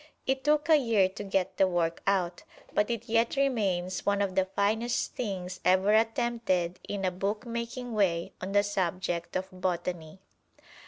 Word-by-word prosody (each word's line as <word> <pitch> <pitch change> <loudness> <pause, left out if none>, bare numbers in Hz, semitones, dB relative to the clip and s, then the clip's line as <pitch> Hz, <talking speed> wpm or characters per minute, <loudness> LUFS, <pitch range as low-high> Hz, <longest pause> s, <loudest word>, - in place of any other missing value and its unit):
It 265 0 0
took 295 +1 +2
a 315 -2 +7
year 225 -8 +3
to 205 +2 -7
get 195 -2 -1
the 190 - +5
work 170 -2 0
out, 180 -3 +1 0.3
but 210 - +2
it 235 0 -3
yet 230 +2 +2
remains 195 -10 0
one 200 0 +1
of 200 -2 0
the 190 0 +2
finest 215 +5 0
things 185 -6 -4
ever 190 +3 +4
attempted 225 -5 +1
in 200 -2 -2
a 185 - +1
bookmaking 235 +5 -3
way 175 -5 +1
on 190 +2 -4
the 205 0 +5
subject 180 -3 -2
of 185 0 -1
botany. 175 -3 -3
200 Hz, 160 wpm, -29 LUFS, 185-230 Hz, 0.3 s, a